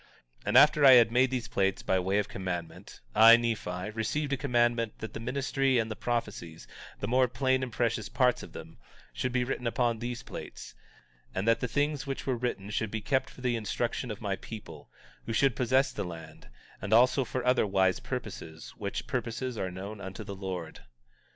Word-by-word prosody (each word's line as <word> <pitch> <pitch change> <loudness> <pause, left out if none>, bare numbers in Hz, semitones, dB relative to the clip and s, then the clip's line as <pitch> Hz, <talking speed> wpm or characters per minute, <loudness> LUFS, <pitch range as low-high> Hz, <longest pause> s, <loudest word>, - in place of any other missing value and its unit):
19:3 - - -35
And - - +4
after 150 0 +6
I 135 -2 +10
had 120 -2 +7
made 125 +2 +4
these 125 -3 -3
plates 95 -5 0
by 95 - +1
way 95 +2 0
of 105 - 0
commandment, 90 -3 -6
I, 115 +1 +9
Nephi, 105 -5 -3
received 140 +7 -2
a - - +3
commandment 120 -4 +1
that 110 -1 -7
the - - -5
ministry 135 +2 0
and 110 -1 0
the - - -3
prophecies, 105 -9 -4 0.3
the - - -3
more 125 +1 +3
plain 130 +2 +1
and 130 -2 -3
precious 115 -1 -1
parts 125 -2 +2
of - - -10
them, - - -11 0.3
should 130 - -2
be 125 0 +1
written 125 -1 -3
upon 115 -1 0
these 120 +1 -5
plates; - - -9 0.6
and 95 +4 -2
that 115 0 +4
the 125 - -2
things 145 +2 -1
which 135 - -4
were 130 - 0
written 115 -4 -3
should 110 0 -1
be 110 - -3
kept 130 +4 0
for - - -14
the 125 -1 0
instruction 115 +3 -2
of 105 - -6
my 100 -2 -2
people, 110 -2 -10 0.4
who 115 - -2
should 135 +2 +3
possess 130 +2 +2
the - - -4
land, 80 -7 -10 0.3
and 100 - -2
also 125 +3 +5
for 125 0 -4
other 125 -3 +3
wise 95 -1 +2
purposes, 80 0 -7
which - - -4
purposes 125 +2 -3
are 95 -4 -2
known 100 +3 -7
unto 95 -1 -7
the 100 - -7
Lord. 95 -4 -6
115 Hz, 200 wpm, -29 LUFS, 100-125 Hz, 0.6 s, I